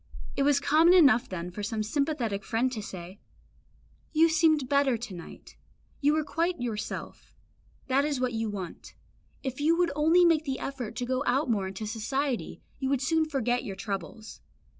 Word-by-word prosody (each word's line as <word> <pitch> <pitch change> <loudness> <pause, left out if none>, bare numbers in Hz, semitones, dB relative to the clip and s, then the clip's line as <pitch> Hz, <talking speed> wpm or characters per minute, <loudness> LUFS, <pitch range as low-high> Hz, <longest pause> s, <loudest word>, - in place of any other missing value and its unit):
It - - -1
was 285 0 +4
common 320 +5 +5
enough 270 -10 +5
then 180 -1 -5
for 210 - -6
some 215 +1 -2
sympathetic 235 -5 -1
friend 240 +5 0
to 225 -4 -4
say, 185 0 -9 0.9
"You 325 +1 +5
seemed 315 -4 +3
better 280 -3 +2
to 225 -3 -7
night 170 -2 -11 0.4
you 295 +1 +3
were 310 0 +1
quite 335 +3 -1
yourself; 220 -3 -5 0.5
that 270 +1 +2
is 290 -3 -1
what 250 -1 0
you 225 -1 -1
want; 190 -4 -7 0.5
if 265 +1 -4
you 325 +3 +3
would 355 -1 +2
only 325 +4 +5
make 325 -2 +4
the 270 -3 -3
effort 250 -5 -5
and 245 - -2
go 260 +1 0
out 260 +1 +2
more 200 -4 0
into 195 +3 -6
society, 240 +4 -3 0.2
you 265 -1 -1
would 275 -2 +1
soon 320 +3 +2
forget 245 -4 0
your 195 - -5
troubles." 200 +2 -6
255 Hz, 180 wpm, -28 LUFS, 215-295 Hz, 0.9 s, common